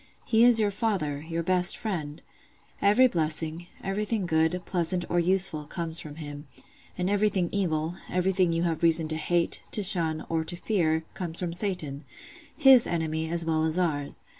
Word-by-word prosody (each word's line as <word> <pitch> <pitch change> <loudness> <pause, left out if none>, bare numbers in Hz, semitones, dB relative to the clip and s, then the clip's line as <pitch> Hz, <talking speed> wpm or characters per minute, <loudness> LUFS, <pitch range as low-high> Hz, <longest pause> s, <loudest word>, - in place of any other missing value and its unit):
He 225 0 +3
is 240 -2 +6
your 210 -2 +1
father, 190 -9 -2
your 165 0 -2
best 180 0 +1
friend: 160 -8 -5 0.6
every 210 +6 +5
blessing, 160 -4 -2 0.2
everything 205 +1 -2
good, 160 +2 +1
pleasant, 175 -1 -1
or 175 - +2
useful, 180 -3 +1
comes 165 +1 -3
from 150 -1 -9
Him; 145 -2 -9 0.5
and 180 0 -1
everything 200 -3 +1
evil, 165 -5 -1 0.2
everything 185 -1 +1
you 165 +1 0
have 165 -2 -1
reason 165 -1 +4
to 155 - -1
hate, 170 +2 +2
to 210 - +3
shun, 165 -5 +1
or 165 -1 -1
to 165 +2 -3
fear, 170 -4 0
comes 170 -3 -6
from 175 -2 -3
Satan—His 190 - +1
enemy 160 -1 -2
as 170 0 -2
well 160 -1 0
as 160 +1 0
ours. 150 -6 -2
170 Hz, 165 wpm, -27 LUFS, 160-190 Hz, 0.6 s, is